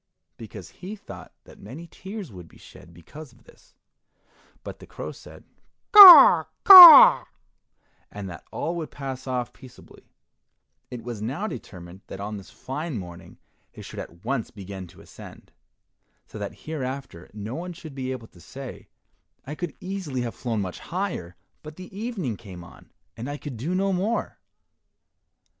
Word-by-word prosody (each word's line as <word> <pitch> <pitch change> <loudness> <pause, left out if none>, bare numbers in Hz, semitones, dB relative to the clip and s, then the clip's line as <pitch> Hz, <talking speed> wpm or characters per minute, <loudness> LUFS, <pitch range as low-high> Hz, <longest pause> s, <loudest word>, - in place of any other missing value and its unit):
because 105 -5 -12
he 195 +4 -10
thought 210 - -13
that - - -18
many 135 +12 -11
tears 195 - -10
would 90 -4 -13
be - - -21
shed 85 - -17
because 120 - -14
of 120 +1 -25
this; - - -24 0.9
but - - -10
the - - -15
crow - - -8
said, - - -15 0.5
"Caw, 415 +4 +10 0.2
caw," 380 +6 +10 0.9
and 100 -1 -8
that 85 -3 -11
all 165 - -4
would 160 -2 -6
pass 135 -2 -8
off 125 -2 -4
peaceably. 130 -2 -18 0.8
It 125 -2 -9
was 120 -3 -8
now 135 - -5
determined 90 - -10
that 95 - -10
on 105 +1 -6
this 100 - -13
fine 145 +1 -7
morning 90 -3 -12 0.4
they - - -12
should - - -10
at 85 +2 -12
once 130 -5 -3
begin 95 -3 -10
to - - -18
ascend, - - -15 0.7
so - - -12
that - - -8
hereafter 135 - -7
no 105 +3 -8
one 175 +5 -7
should 165 -3 -12
be 130 -1 -6
able 125 -3 -8
to 85 - -20
say, 130 - -11 0.6
"I 145 - -7
could 175 +3 -7
easily 180 -9 -6
have 120 -1 -5
flown 115 -4 -4
much 90 -2 -7
higher, 170 - -6 0.3
but 155 0 -12
the 185 +2 -13
evening 200 - -5
came 95 -6 -12
on, - - -18 0.2
and 120 +5 -8
I 145 - -6
could 145 -3 -9
do 150 +11 -4
no 195 +1 -1
more." 205 +6 -3
130 Hz, 160 wpm, -23 LUFS, -, 0.9 s, Caw